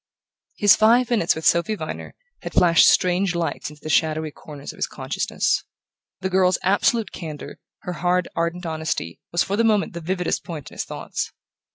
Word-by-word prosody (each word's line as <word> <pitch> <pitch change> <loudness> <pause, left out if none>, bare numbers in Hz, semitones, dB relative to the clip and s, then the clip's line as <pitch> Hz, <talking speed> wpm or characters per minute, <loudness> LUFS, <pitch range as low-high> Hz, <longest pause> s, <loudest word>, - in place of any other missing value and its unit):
His 205 -1 +6
five 235 +3 +4
minutes 210 -8 +2
with 160 - -6
Sophy 170 +6 +3
Viner - - -7 0.3
had - - -7
flashed 170 -1 +6
strange 180 0 +2
lights 170 -3 -2
into 150 -1 -16
the 155 - -5
shadowy 155 +1 +1
corners 145 -1 -10
of - - -17
his - - -1
consciousness. - - -1 0.6
The 190 - -1
girl's 185 -1 +3
absolute 205 +2 +2
candour, 155 -4 -8 0.2
her 180 - -5
hard 180 +1 +1
ardent 170 +2 -2
honesty, 160 - -3
was 175 - +2
for 200 - -2
the 230 - +3
moment 215 -5 +2
the 170 - -6
vividest 180 +2 -1
point 160 -7 -7
in - - -13
his - - -3
thoughts. - - -5
175 Hz, 180 wpm, -23 LUFS, 160-195 Hz, 0.6 s, His